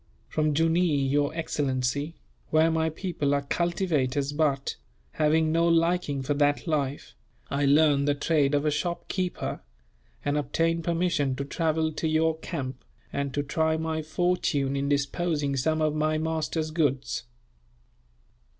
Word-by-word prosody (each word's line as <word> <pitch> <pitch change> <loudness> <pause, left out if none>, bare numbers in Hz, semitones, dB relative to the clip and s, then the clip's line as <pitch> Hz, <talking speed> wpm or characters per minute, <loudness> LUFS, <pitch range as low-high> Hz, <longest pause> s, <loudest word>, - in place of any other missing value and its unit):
"From 155 -1 0
Jooneer, 160 -3 +2
your 145 +1 +2
excellency, 145 -1 -1 0.3
where 160 +1 +4
my 160 0 +1
people 155 -4 -1
are 140 - -1
cultivators 145 -4 0
but, 145 -3 0 0.4
having 155 - +2
no 165 +1 +3
liking 165 -4 +1
for 145 +3 0
that 145 0 +1
life, 145 -4 -2 0.4
I 140 0 +1
learned 145 0 +4
the 145 - +3
trade 145 -1 +2
of 145 +1 +1
a 150 - +2
shopkeeper, 175 +3 -3 0.6
and 145 +1 +1
obtained 165 +3 0
permission 165 -6 +1
to 140 - -4
travel 160 +1 0
to 155 +1 -2
your 160 0 +1
camp, 130 -4 -5 0.3
and 140 -1 -2
to 145 - 0
try 160 +2 +1
my 160 0 -2
fortune 155 -4 0
in 140 0 -1
disposing 145 +1 0
of 135 - 0
some 155 +3 +1
of 155 -1 +1
my 155 0 +1
master's 160 0 -2
goods." 145 -7 0
155 Hz, 140 wpm, -27 LUFS, 140-160 Hz, 0.6 s, where